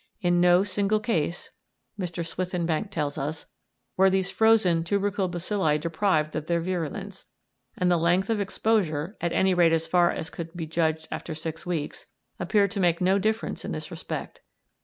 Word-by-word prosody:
In 175 -3 +2
no 180 +1 +5
single 205 +2 +1
case, 175 -7 -2 0.5
Mr. 175 -2 -3
Swithinbank 175 +1 -2
tells 150 -6 -2
us, 150 +3 -4 0.5
were 190 +1 +5
these 190 0 0
frozen 215 -7 +4
tubercle 200 +1 0
bacilli 175 -3 0
deprived 160 -1 0
of 155 0 -3
their 170 -1 +1
virulence, 185 +3 -4 0.5
and 180 -1 +2
the 175 - +4
length 175 +5 +2
of 215 -2 +1
exposure, 195 -4 0
at 170 0 0
any 190 +1 +3
rate 170 -2 +4
as 165 0 +1
far 175 +1 +3
as 160 - -4
could 165 0 -7
be 165 - -3
judged 160 0 -1
after 160 - -5
six 160 +2 -6
weeks, 160 -4 -3 0.3
appeared 200 +2 +2
to 205 - -3
make 175 -3 +2
no 190 +2 +3
difference 220 +3 -1
in - - -4
this - - -6
respect. - - -6
175 Hz, 170 wpm, -26 LUFS, 165-195 Hz, 0.5 s, no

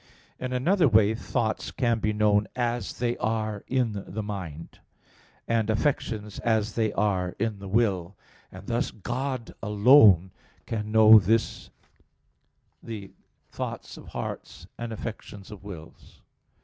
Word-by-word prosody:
In 130 0 -4
another 165 +7 +3
way 110 -2 +4
thoughts 110 -1 -2
can 120 -3 0
be 110 - 0
known 105 0 +2
as 120 0 -2
they 120 -1 -1
are 110 -2 -2
in 115 -6 -1
the 110 +4 -4
mind, 90 -7 -7 0.7
and 115 -2 +1
affections 110 -3 -1
as 110 -2 0
they 110 -2 0
are 95 -3 0
in 110 -3 -2
the 100 - -8
will: 95 -4 0 0.4
and 95 +1 -11
thus 120 +3 -1
God 125 +3 -4
alone 105 - +6 0.3
can 105 -2 -4
know 110 0 +8
the 105 0 -6 0.4
thoughts - - -6
of - - -13
hearts - - -7
and 120 -1 -6
affections 105 -2 -8
of 105 -2 -10
wills. 85 -6 -12
110 Hz, 125 wpm, -26 LUFS, 100-115 Hz, 0.7 s, know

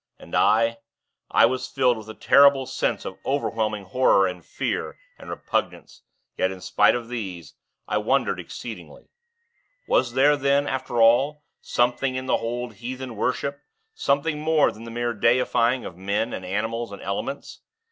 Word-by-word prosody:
And - - -15
I 115 +2 +3 0.5
I - - +5
was 130 0 -1
filled 130 -3 +2
with 110 -1 -10
a 110 - -8
terrible 140 -1 +5
sense - - -2
of - - -7
overwhelming 110 -6 -1
horror 100 -1 +3
and 90 -2 -4
fear - - -3 0.2
and - - -11
repugnance; - - -3 0.4
yet, 95 - +2
spite - - +3
of 120 -1 -4
these, 95 -9 -6 0.3
I 105 - 0
wondered 130 +6 +1
exceedingly. - - -9 0.8
Was 120 -2 +2
there 140 +3 +5
then, 140 0 +2
after 130 -3 -2
all, 135 +7 +4 0.2
something 125 +2 0
in 130 0 -3
the - - 0
old 120 0 -2
heathen 125 +1 -6
worship, 140 +5 -2 0.3
something 150 - 0
more 155 -1 +3
than 115 +2 -11
the - - -8
mere 120 +1 -2
deifying 120 +2 +2
of 85 - -8
men, 100 +4 -1
animals, 110 +5 -3
and 100 - -9
elements? 100 +8 -5
120 Hz, 150 wpm, -24 LUFS, 110-135 Hz, 0.8 s, I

